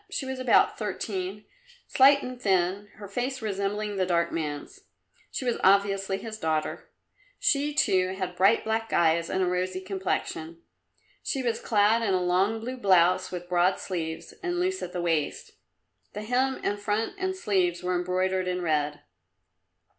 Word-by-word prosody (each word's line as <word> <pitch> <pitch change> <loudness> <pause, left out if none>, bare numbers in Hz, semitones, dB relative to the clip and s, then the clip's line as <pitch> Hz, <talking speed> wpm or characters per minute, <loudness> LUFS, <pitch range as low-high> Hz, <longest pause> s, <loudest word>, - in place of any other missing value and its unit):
She 270 - -3
was 265 0 -4
about 255 -2 +3
thirteen, 205 -2 -4 0.4
slight 280 +1 +5
and 250 -1 -7
thin, 190 0 +1
her 205 -2 -9
face 250 +6 -3
resembling 205 -1 -2
the 185 - +2
dark 170 -1 +1
man's. 155 - -5 0.5
She 260 - -4
was 240 - 0
obviously 195 0 +3
his 220 +1 -7
daughter. 155 -3 -2 0.5
She, 290 +1 +1
too, 185 -7 +2
had 185 -2 -4
bright, 195 +5 +4
black 225 0 -2
eyes 170 0 +2
and 190 0 0
a - - +2
rosy 180 +1 -1
complexion. 185 -4 -4 0.6
She 270 -3 -2
was 235 -2 -1
clad 215 +1 +3
in 200 -4 +1
a - - +2
long 190 +5 +2
blue 255 +3 -5
blouse 185 -5 +3
with 175 -1 -6
broad 180 +1 +2
sleeves, 165 -4 -5
and 350 -1 -2
loose 375 +1 0
at 175 - -5
the 180 -1 -3
waist 165 -4 -1 0.6
the 210 - -5
hem 255 +4 0
and 205 0 -1
front 210 +2 -1
and 375 0 -1
sleeves 185 - 0
were 180 0 0
embroidered 185 +1 0
in 180 0 -2
red. 150 -2 0
195 Hz, 160 wpm, -27 LUFS, 180-225 Hz, 0.6 s, slight